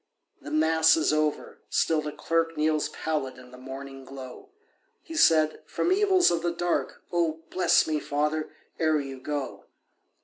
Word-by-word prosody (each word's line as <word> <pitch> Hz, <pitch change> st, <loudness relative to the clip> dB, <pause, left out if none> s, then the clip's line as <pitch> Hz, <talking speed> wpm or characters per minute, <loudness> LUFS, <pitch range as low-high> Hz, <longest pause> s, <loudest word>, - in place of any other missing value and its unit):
The -, -, -8 dB
Mass 160 Hz, +1 st, +4 dB
is 155 Hz, -, +2 dB
over—still 155 Hz, +1 st, 0 dB
the 150 Hz, 0 st, -5 dB
clerk 165 Hz, +1 st, -1 dB
Kneels 155 Hz, 0 st, +1 dB
pallid 150 Hz, -5 st, -3 dB
in 125 Hz, 0 st, -14 dB
the 125 Hz, -, -12 dB
morning 135 Hz, +1 st, -8 dB
glow. 130 Hz, -1 st, -10 dB, 0.5 s
He 325 Hz, -, -10 dB
said, 155 Hz, -, +4 dB
"From 360 Hz, -, -1 dB
evils 380 Hz, -, +4 dB
of 170 Hz, -1 st, 0 dB
the 175 Hz, 0 st, 0 dB
dark 175 Hz, 0 st, -2 dB
Oh, 165 Hz, -2 st, 0 dB
bless 180 Hz, -2 st, +4 dB
me, 155 Hz, -1 st, -1 dB
father, 150 Hz, +2 st, -1 dB, 0.3 s
ere 155 Hz, -2 st, +2 dB
you 135 Hz, -2 st, -6 dB
go. 145 Hz, 0 st, -5 dB
155 Hz, 150 wpm, -27 LUFS, 140-165 Hz, 0.5 s, Mass